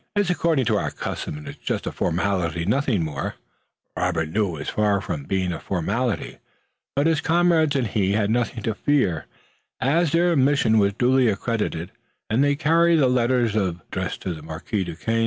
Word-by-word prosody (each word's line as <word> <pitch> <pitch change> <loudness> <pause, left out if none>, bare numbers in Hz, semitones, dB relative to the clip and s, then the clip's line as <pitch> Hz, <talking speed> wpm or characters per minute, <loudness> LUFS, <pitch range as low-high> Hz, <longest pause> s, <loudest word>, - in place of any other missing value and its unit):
It's 205 -3 +2
according 165 -6 +1
to - - +2
our - - -2
custom, 75 - -5
and 75 - -10
it's - - -9
just - - -2
a - - -2
formality, 85 -2 -1
nothing 115 - +1
more." 75 -3 -4 0.6
Robert 85 -3 -1
knew 105 +5 +1
that 85 - -5
it - - -8
was - - -5
far 105 -2 +1
from 85 -8 -5
being 95 0 -1
a 80 - -5
formality, 100 +4 -2 0.6
but 140 +2 +2
his 165 -1 +2
comrades 165 -3 +3
and 130 -3 +1
he 100 -2 0
had 105 0 +1
nothing 115 -1 -1
to 110 - 0
fear, 105 - 0 0.5
as 155 +4 +2
their 170 +1 +3
mission 130 -5 +3
was 100 -1 +2
duly 125 +3 +3
accredited 105 -5 -2 0.4
and 120 +5 +3
they 145 0 +3
carried 165 +3 +3
the 145 -5 +4
letters 125 -2 +2
to 95 -5 0 0.5
the 80 - -9
Marquis 80 +5 -3
Duquesne. 100 +7 -2
110 Hz, 180 wpm, -23 LUFS, 90-140 Hz, 0.6 s, the